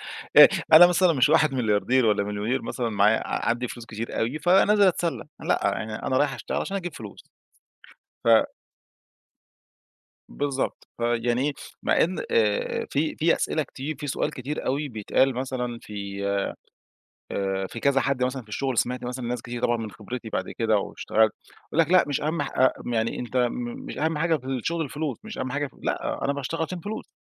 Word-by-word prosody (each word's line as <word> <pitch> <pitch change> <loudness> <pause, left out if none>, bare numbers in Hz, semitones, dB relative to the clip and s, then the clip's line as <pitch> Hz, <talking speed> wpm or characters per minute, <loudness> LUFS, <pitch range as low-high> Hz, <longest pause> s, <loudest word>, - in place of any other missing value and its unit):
آآ، - - +7 0.3
أنا 175 +3 +11
مثلًا 180 -1 +3
مش 135 +1 +3
واحد 155 -3 +4
ملياردير 120 +1 +2
ولا 105 -2 +2
مليونير 105 +6 -2
مثلًا 120 -3 -3
معايا 105 +1 +2
ع - - -1
عندي 120 +1 0
فلوس 120 -1 -9
كتير 110 +1 -5
أوي، 125 +7 -1
فنازل 200 +4 +4
أتسلّى. 170 -2 0 0.2
لأ، - - +1
يعني 110 -1 -1
أنا 130 - -1
رايح 145 -2 +2
أشتغل - - -4
علشان 195 0 -2
أجيب 175 -3 -5
فلوس. 105 -3 -10 1.0
ف 115 -1 +5 1.8
بالضبط. 140 -2 -3
فيعني 120 +1 +1
إيه، 150 - 0 0.3
مع - - +2
إن، 180 +2 -3
آآ، 105 -2 +1
في 155 +3 0
في 165 +2 +3
أسئلة 155 - 0
كتير، 140 +2 -6
فيه 145 - -5
سؤال 135 - -1
كتير 135 +4 -5
أوي 145 +3 -1
بيتقال، 120 +3 +1
مثلًا 125 -2 -3
في 100 -2 -6 1.5
في 115 - -7
كذا 140 -1 +3
حد 130 -2 0
مثلًا 130 +1 -2
في 110 - -23
الشغل 130 +3 -2
سمِعت 125 0 0
مثلًا 125 0 -4
لناس 120 0 -3
كتير 120 0 -6
طبعًا 120 - +2
من 110 -2 -5
خبرتي 120 +3 -7
بعد 95 -3 -3
كده 110 -2 +3
واشتغلت، 110 +2 +1 0.4
بيقول 165 - +3
لك: 165 +1 +2
"لأ، 185 - +6
مش 145 - -1
أهم 155 +1 -1
ح 140 - -4
آآ، 130 0 +5 0.2
يعني 115 0 0
أنت 125 +1 -5
م 240 - -1
مش - - -7
أهَم 160 0 0
حاجة 165 0 +2
في 130 -3 -11
الشغل 155 +6 -1
الفلوس، 145 +1 -4
مش 220 - -8
أهم 130 -1 -3
حاجة 145 +1 -1
في" 130 - -17
لأ، - - -2
أنا 140 - +2
باشتغل 145 +4 -3
عشان 175 +2 -4
فلوس. 215 +5 -7
130 Hz, 185 wpm, -25 LUFS, 115-155 Hz, 1.8 s, أنا